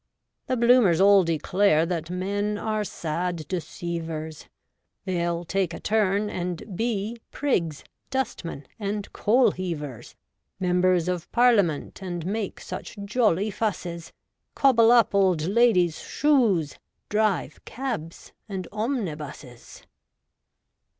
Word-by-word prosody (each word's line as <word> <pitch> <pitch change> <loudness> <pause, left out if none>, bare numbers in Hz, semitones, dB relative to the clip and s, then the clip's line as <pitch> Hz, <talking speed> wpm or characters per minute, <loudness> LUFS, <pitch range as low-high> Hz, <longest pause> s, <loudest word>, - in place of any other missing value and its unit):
The 255 - 0
Bloomers 235 -8 +5
all 200 0 +6
declare 165 +1 +2
That 165 -2 -3
men 200 +3 -2
are 215 0 -1
sad 170 -2 -3
deceivers; 165 -3 -5 0.6
They'll 175 -2 -1
take 185 -2 -1
a - - -7
turn, 210 -1 +1
and 180 +1 -5
be 225 +1 -2
Prigs, 170 - -1 0.3
dustmen, 225 - -3
and 205 0 -4
coalheavers 180 - 0 0.2
— - - -54
Members 180 -1 +3
of 180 -2 -3
Parliament, 205 -11 +2
And 175 -3 -5
make 205 +1 -3
such - - -7
jolly 210 -2 +1
fusses; 180 -5 -3 0.4
Cobble 235 -4 +5
up 235 -4 +5
old 185 -5 +3
ladies' 185 -4 +3
shoes; 230 - +1 0.3
Drive 210 -3 0
cabs 230 -12 -5 0.2
and 190 -3 -4
omnibuses. 155 - -5
190 Hz, 105 wpm, -25 LUFS, 170-215 Hz, 0.6 s, all